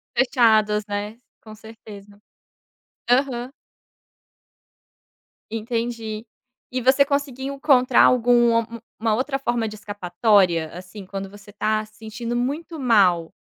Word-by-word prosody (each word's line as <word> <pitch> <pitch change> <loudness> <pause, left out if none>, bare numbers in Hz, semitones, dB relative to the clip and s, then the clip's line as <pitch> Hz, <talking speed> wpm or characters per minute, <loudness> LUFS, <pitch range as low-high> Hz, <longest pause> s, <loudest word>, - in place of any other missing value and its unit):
Fechados, 220 -5 +3
né, 205 +2 -4 0.2
com 215 -1 -12
certeza. 205 -2 -14 0.9
Aham. 250 -1 +1 2.0
Entendi. 225 -1 -4 0.5
E 255 - -2
você 265 +3 +4
conseguiu 280 -1 -3
encontrar 265 -3 +4
alguma 240 -2 +4 0.3
uma 220 0 0
outra 270 +3 -1
forma 240 -4 -1
de 215 - -7
escapatória 190 -4 +1
assim 185 +3 -10
quando 195 0 -6
você 205 0 -15
está 215 +1 -1
se 215 - -24
sentindo 230 +2 -6
muito 300 +6 -3
mal, 190 -9 +2
225 Hz, 105 wpm, -22 LUFS, 205-250 Hz, 2.0 s, você